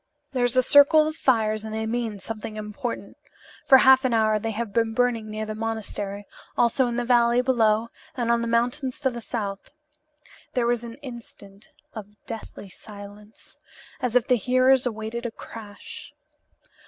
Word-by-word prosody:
"There 255 -3 0
is 245 +1 +1
a 255 - +6
circle 290 +3 +6
of 310 - -4
fires 220 -7 +1
and 220 - -6
they 220 0 -3
mean 225 -2 -3
something 215 +1 -7
important. 215 +3 -6 0.5
For 265 - +9
half 265 0 +6
an 250 -3 +1
hour 215 -1 +2
they 225 +2 -3
have 220 -1 -4
been 225 0 0
burning 240 -3 0
near 215 0 -4
the 215 - -5
monastery; 210 -2 -4 0.3
also 245 +2 +3
in 240 - -3
the 245 0 -1
valley 240 0 +4
below 230 -3 +2 0.3
and 235 -1 0
on 235 0 +2
the 235 - -2
mountains 245 +3 -1
to 265 -2 +1
the 235 -1 -7
south." 205 -4 -5 0.9
There 245 -2 +2
was 240 0 0
an 230 -1 -8
instant 225 -4 -11 0.3
of 210 -2 -9
deathly 225 -2 -8
silence, 205 +2 -12 0.4
as 250 -2 -2
if 250 - +4
the 250 - +4
hearers 255 +3 +3
awaited 225 +1 -4
a - - -7
crash. 210 -2 -10
230 Hz, 170 wpm, -24 LUFS, 215-245 Hz, 0.9 s, For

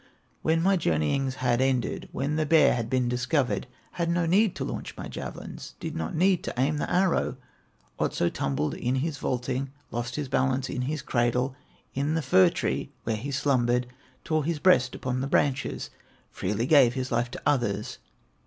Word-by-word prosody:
"When 165 +1 +2
my 195 +1 +4
journeyings 130 - 0
had 125 -1 +1
ended, 130 -3 0
When 140 +3 -1
the 155 0 +1
bear 160 0 +6
had 115 -2 -2
been 125 -1 +1
discovered, 125 +2 0 0.2
Had 170 -1 -2
no 170 0 +1
need 195 +4 +3
to - - -3
launch - - -6
my - - -6
javelins, - - -7
Did - - -5
not 80 0 -3
need 185 +2 +3
to - - -4
aim 145 +4 +2
the - - -2
arrow; 180 -8 +2 0.6
Otso 85 - +1
tumbled 70 0 -1
in 125 +2 -1
his 140 +1 -2
vaulting, 130 +2 -2 0.2
Lost 120 +1 -3
his 150 -2 -3
balance 130 0 0
in 125 - -2
his 140 +2 -2
cradle, 125 +2 +1 0.4
In 145 +4 0
the 165 - 0
fir 95 -9 +6
tree - - -2
where 115 - -1
he 120 +7 -5
slumbered; 125 -3 +1 0.4
Tore 155 -1 0
his 165 +2 -1
breast 130 -7 +4
upon 130 0 -2
the 135 - -1
branches, 135 -1 0 0.4
Freely 105 +5 -1
gave 135 -4 +5
his 130 -1 -3
life 120 +1 +1
to - - -8
others. 120 -8 0
130 Hz, 180 wpm, -27 LUFS, 120-150 Hz, 0.6 s, bear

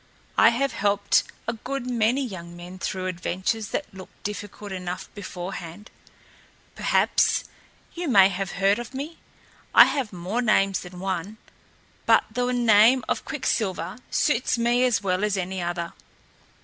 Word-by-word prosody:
I 225 - +7
have 260 +3 0
helped 205 -2 +2 0.2
a 235 - 0
good 260 +3 -5
many 245 +2 +1
young 175 -6 -8
men 180 +2 -10
through 185 0 -3
adventures 185 +4 -2
that 295 - -4
looked 190 -1 -13
difficult 205 0 -6
enough 185 0 -5
beforehand. 185 0 -7 0.8
Perhaps - - +2 0.5
you 350 0 -4
may 195 -7 +6
have 195 0 -4
heard 195 +3 +2
of 240 +2 -8
me. 300 +5 -6 0.6
I - - +11
have 265 -7 -2
more 185 +6 -2
names 195 -4 +2
than 180 0 -10
one, 190 +2 -3 0.7
but - - +6
the 245 +2 0
name 235 +1 +5
of - - -2
Quicksilver 210 +2 -2
suits 255 -4 +1
me 240 +2 +3
as 245 -4 +1
well 185 0 0
as 210 -2 +1
any 185 0 -3
other. 175 0 -3
205 Hz, 145 wpm, -25 LUFS, 185-240 Hz, 0.8 s, I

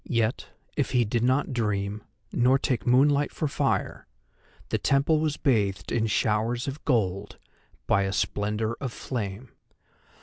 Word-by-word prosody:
Yet, 115 0 -1 0.3
if - - -1
he 125 -2 +3
did 115 +2 -1
not 130 +2 +1
dream, 105 -3 -1 0.3
nor 125 +2 +4
take 125 -3 -2
moonlight 140 +3 +4
for 155 - -2
fire, 140 - -1 0.6
the - - 0
temple 140 +3 +2
was 155 -1 -1
bathed 105 -9 0
in 115 -1 +1
showers 115 +3 0
of 140 +2 -5
gold 100 -6 0 0.5
by 100 - +3
a 95 - -1
splendour 105 +3 -1
of 130 -3 -3
flame. 115 -1 -5
120 Hz, 140 wpm, -26 LUFS, 105-135 Hz, 0.6 s, nor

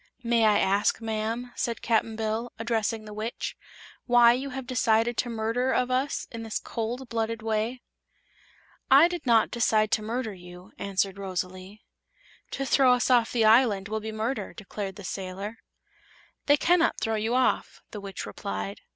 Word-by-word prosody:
"May 235 -1 +3
I 210 -1 +5
ask, 200 +2 +2
ma'am," 225 +2 -3
said 230 -3 -3
Cap'n 225 -1 +1
Bill, 220 +2 -2
addressing 225 -1 -1
the 210 - -9
Witch, 215 +3 -4 0.5
"why 240 -1 +7
you 265 +3 -3
have 265 -1 -6
decided 235 -2 +2
to 245 - 0
murder 230 +3 -1
of 250 0 +1
us 260 +3 -1
in 230 - -6
this 225 -1 -3
cold 240 +3 -4
blooded 225 -1 -2
way?" 225 +3 -2 1.1
"I 280 +5 +8
did 350 -5 -6
not 230 -2 +4
decide 215 -2 +2
to - - +2
murder 225 0 -3
you," 180 +2 -13
answered 195 0 -1
Rosalie. 185 +1 -5 0.7
"To 275 - -3
throw 265 -1 +5
us 250 +1 +1
off 235 -2 +4
the 230 -3 +2
island 215 -4 +4
will 220 0 -1
be 220 +1 -6
murder," 220 +5 -3
declared 200 -2 -6
the 200 - -10
sailor. 190 +1 -5
"Then - - -32
they 290 0 +6
cannot 340 +2 +3
throw 225 - -1
you 220 +3 0
off," 255 0 0
the 210 - -7
Witch 195 -1 -6
replied. 100 -1 -5
225 Hz, 170 wpm, -27 LUFS, 210-245 Hz, 1.1 s, I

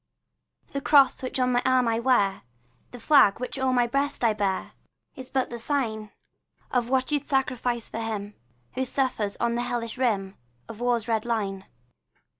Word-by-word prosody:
The 280 - -3
cross 275 -3 +5
which 260 0 -4
on 250 0 +2
my 245 0 +2
arm 255 -1 +3
I 225 0 +1
wear, 235 -6 +2 0.5
The 245 - -11
flag 230 -5 +5
which 250 +2 -5
o'er 260 0 +1
my 245 -1 +3
breast 275 +3 -1
I 225 -2 +4
bear, 200 -3 -2 0.4
Is 260 -3 -10
but 260 -2 -1
the 235 - -5
sign 225 -5 -2 0.6
Of 245 -2 0
what 260 +1 +1
you 295 - +2
'd 285 - -23
sacrifice 250 -4 -1
for - - -6
him 210 -2 -4 0.4
Who 260 - -1
suffers 255 -6 -1
on 235 - +1
the 240 - -1
hellish 240 0 -4
rim 200 -6 0 0.3
Of 220 - -9
war's 240 -2 0
red 220 -2 0
line. 200 -5 -2
240 Hz, 180 wpm, -26 LUFS, 220-260 Hz, 0.6 s, cross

